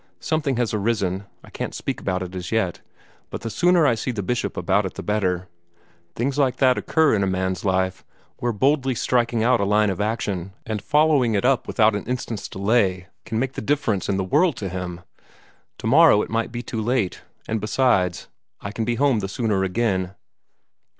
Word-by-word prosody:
Something 155 -4 -1
has 120 -3 0
arisen 100 -3 -1 0.2
I - - -15
can't - - -5
speak - - -4
about 95 -1 -1
it 90 0 -8
as 90 -2 -6
yet 110 -6 0 0.5
but - - -6
the 115 - -4
sooner 175 +2 +3
I 135 - +4
see 115 +3 -3
the 110 -5 -2
Bishop 110 -2 -2
about 95 +3 +2
it 95 - -5
the - - -6
better. 95 -4 -1 0.7
Things 135 +4 -1
like 130 -3 +2
that 130 -2 +4
occur 160 -2 +2
in 105 - +2
a 95 - +1
man's 95 0 -1
life, 95 -1 0 0.3
where 120 - -1
boldly 135 +3 +1
striking 120 -2 +1
out 120 -2 +3
a - - +2
line 105 +1 +3
of 95 - -3
action, 100 -4 -2
and 110 -2 -3
following 150 -4 +3
it 100 - 0
up 130 -1 +2
without 110 -2 +3
an 105 - -3
instant's 120 -3 -4
delay, 95 -3 +1 0.2
may 110 - 0
make 130 +3 0
all - - -22
the - - -2
difference 110 -7 0
in 100 - +1
the 95 - 0
world 150 - +2
to 100 -3 -4
him. 90 -1 -5 0.8
Tomorrow 135 -1 +5
it - - -8
might 115 0 -1
be 120 0 -5
too 115 -3 -4
late; 115 -4 -1 0.3
and, 110 -1 -2
besides, 105 -6 +1 0.3
I 100 - -6
can 110 +1 -3
be 120 +1 0
home 135 -2 +2
the 95 -1 -4
sooner 105 -3 0
again." 95 -2 -1
110 Hz, 200 wpm, -23 LUFS, 95-125 Hz, 0.8 s, Tomorrow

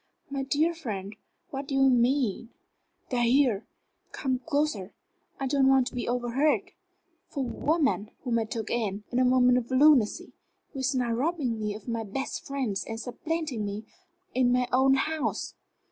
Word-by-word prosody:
"My 275 -1 -2
dear 300 +5 +1
friend, 210 - -5 0.4
what 275 -1 -5
do 275 - -2
you 270 0 +5
mean?" 245 -3 +2 0.6
"They 250 - 0
are - - +2
here 240 -3 +3 0.4
come 260 -3 -1
closer, 285 - -1 0.5
I 270 - -1
don't 270 0 +3
want 265 -1 +5
to - - -21
be 245 - -3
overheard 270 +10 +1 0.6
for 280 - -4
a - - -3
woman 280 -7 0
whom 240 -3 +1
I 225 - -1
took 225 -1 -4
in, 210 -4 -1
in 245 - +1
a - - +4
moment 250 0 +5
of 240 - -8
lunacy 260 -4 +4 0.4
who 275 - -5
is 265 +1 0
now 245 -2 0
robbing 255 -2 -1
me 210 -1 -2
of 215 - -11
my 230 -1 -2
best 245 +6 -4
friends 260 -8 -2
and 225 0 -6
supplanting 290 0 -3
me 205 +2 -4 0.5
in 250 -1 +3
my 250 0 +2
own 265 +1 +5
house." 310 +2 -1
255 Hz, 175 wpm, -28 LUFS, 230-275 Hz, 0.6 s, you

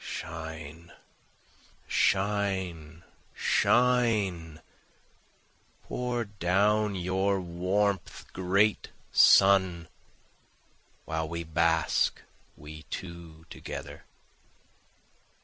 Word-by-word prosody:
Shine! 80 +1 -8 0.9
shine! 95 -5 -1 0.3
shine! 110 -10 +1 1.2
Pour 125 -1 -3
down 100 +2 +1
your 95 +2 0
warmth, 95 +3 -2
great 100 +4 +1 0.2
sun.' 95 -4 +5 1.2
While 80 0 -3
we 85 0 -4
bask, 80 0 +1 0.4
we 75 +1 -11
two 85 -2 -9
together. - - -8
90 Hz, 60 wpm, -28 LUFS, 80-100 Hz, 1.2 s, sun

